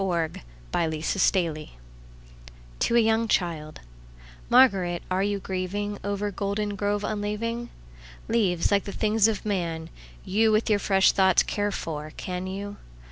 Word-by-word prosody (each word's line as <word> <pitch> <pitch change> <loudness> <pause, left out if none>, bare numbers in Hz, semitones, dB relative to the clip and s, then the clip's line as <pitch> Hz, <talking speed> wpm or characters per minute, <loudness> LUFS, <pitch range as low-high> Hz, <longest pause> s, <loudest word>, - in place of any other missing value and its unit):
Spring 170 -4 -1 0.3
and 160 -2 0
Fall 170 -5 +1 1.1
to 235 - +1
a - - +7
young 225 0 +2
childMÁRGARÉT, 155 - 0
áre 190 +2 +1
you 200 -1 -1
gríevingOver 200 +2 -3
Goldengrove 205 +1 -2
unleaving? 215 +3 -3 0.6
Leáves, 195 -7 +1
líke 200 -1 +2
the 200 - -5
things 215 0 +2
of 215 -2 -2
man, 170 -5 -2 0.4
youWith 215 +3 +2
your 210 -1 +3
fresh 195 -1 +4
thoughts 190 -2 +4
care 205 0 -1
for, 155 -5 -5
can 180 0 -4
you? 200 +2 -6
200 Hz, 120 wpm, -26 LUFS, 170-210 Hz, 1.1 s, a